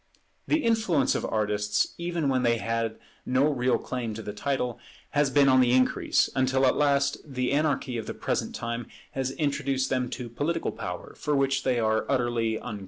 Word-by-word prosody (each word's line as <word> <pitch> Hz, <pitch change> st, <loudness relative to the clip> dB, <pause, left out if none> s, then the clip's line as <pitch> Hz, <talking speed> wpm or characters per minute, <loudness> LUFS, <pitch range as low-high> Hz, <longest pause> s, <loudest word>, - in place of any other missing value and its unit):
The 310 Hz, 0 st, +2 dB
influence 220 Hz, -, +2 dB
of -, -, -2 dB
artists, 105 Hz, -1 st, 0 dB
even 170 Hz, -3 st, -1 dB
when 130 Hz, -2 st, +2 dB
they 120 Hz, -1 st, +2 dB
had 115 Hz, 0 st, -2 dB, 0.3 s
no 130 Hz, +2 st, +2 dB
real 125 Hz, -1 st, +2 dB
claim 120 Hz, -4 st, -4 dB
to 110 Hz, -, -6 dB
the 105 Hz, -, -5 dB
title, 125 Hz, +1 st, -2 dB, 0.3 s
has 145 Hz, -1 st, +2 dB
been 140 Hz, +1 st, +4 dB
on 130 Hz, -1 st, +6 dB
the 125 Hz, -1 st, +3 dB
increase; 130 Hz, 0 st, +3 dB
until 130 Hz, 0 st, +2 dB
at 130 Hz, -, +3 dB
last 140 Hz, -1 st, +2 dB
the 130 Hz, -4 st, -2 dB
anarchy 140 Hz, -4 st, 0 dB
of 110 Hz, -, -7 dB
the -, -, -5 dB
present -, -, -2 dB
time 120 Hz, 0 st, -4 dB, 0.2 s
has 130 Hz, -1 st, -2 dB
introduced 140 Hz, -2 st, -1 dB
them 125 Hz, -1 st, 0 dB
to 125 Hz, 0 st, -5 dB
political 145 Hz, +8 st, -2 dB
power, 90 Hz, -5 st, -6 dB
for 150 Hz, 0 st, -1 dB
which 135 Hz, -1 st, +2 dB
they 125 Hz, -3 st, +1 dB
are 110 Hz, -1 st, +1 dB
utterly 120 Hz, -4 st, +1 dB
unqualified. 110 Hz, -2 st, -6 dB
130 Hz, 185 wpm, -27 LUFS, 115-140 Hz, 0.3 s, on